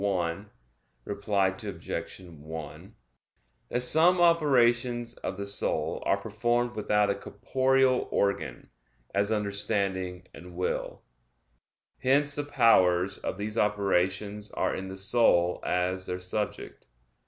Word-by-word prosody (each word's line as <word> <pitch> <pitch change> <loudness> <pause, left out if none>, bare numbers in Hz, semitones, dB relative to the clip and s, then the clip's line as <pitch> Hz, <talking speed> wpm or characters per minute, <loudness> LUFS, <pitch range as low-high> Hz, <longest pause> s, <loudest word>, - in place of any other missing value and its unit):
1, 90 -4 0 0.8
ad 100 0 -7
1), 90 -5 -4 0.7
that 125 - -1
some 160 +8 +4
operations 125 -8 +3
of 95 - -5
the 100 - -4
soul 100 - -1
are 100 - +3
performed 120 +4 -1
without 105 -1 +2
a - - -1
corporeal 130 +4 +1
organ, 80 -10 -2 0.4
as 100 +2 +1
understanding 100 -3 -1
and 90 0 -12
will. 90 +1 -3 1.0
Hence 145 +3 +2
the 145 - -1
powers 100 -9 +3
of - - -4
these 105 +2 -3
operations 100 0 0
are - - 0
in 95 - -5
the 95 0 -7
soul 95 -4 +2
as 90 +1 -1
their 90 0 -3
subject. 95 - -5
100 Hz, 110 wpm, -28 LUFS, 95-120 Hz, 1.0 s, some